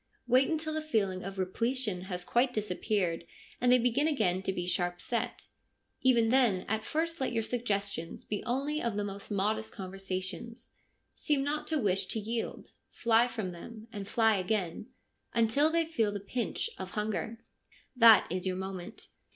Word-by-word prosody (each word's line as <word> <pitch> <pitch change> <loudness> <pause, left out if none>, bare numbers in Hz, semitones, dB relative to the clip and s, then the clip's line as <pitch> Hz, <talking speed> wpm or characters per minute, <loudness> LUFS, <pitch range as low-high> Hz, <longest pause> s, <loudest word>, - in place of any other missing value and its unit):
Wait 255 +2 +4
until 315 -1 -1
the 315 - -1
feeling 200 -11 0
of 195 0 -6
re 190 - +1
pletion 220 -2 -1
has 180 -2 -4
quite 245 +6 +2
disappeared 200 -5 -1 0.4
and 245 0 +4
they 250 - +8
begin 245 +5 +2
again 195 - +1
to 190 - -1
be 175 -2 -3
sharp 175 0 -1
set. 235 +4 -3 0.6
Even 235 -3 +4
then 235 -7 +4
at 220 0 0
first 330 +4 -2
let 265 - 0
your 225 -2 0
suggestions 200 -8 -2
be 210 - -3
only 280 +5 -1
of 235 -3 -1
most 200 -1 -4
modest 215 +2 0
conversation. 190 +2 -5 0.6
Seem 290 -2 +1
not 300 +2 -2
to 315 - +1
wish 195 -6 +1
to 220 - -1
yield 225 +2 -4 0.2
Fly 230 +1 +3
from 220 -6 -4
them 215 +6 -10
— - - -23
and 200 -2 -5
fly 225 -2 +3
again; 185 0 -1 0.5
until 235 +7 +4
they 335 0 +2
feel 230 -10 +1
the 205 - -3
pinch 240 - -2
of 190 - -5
hunger. 220 +2 -2 0.5
That 230 -3 +8
is 185 +1 -1
your 185 -1 -1
moment. 190 -2 -6
220 Hz, 170 wpm, -31 LUFS, 190-245 Hz, 0.6 s, they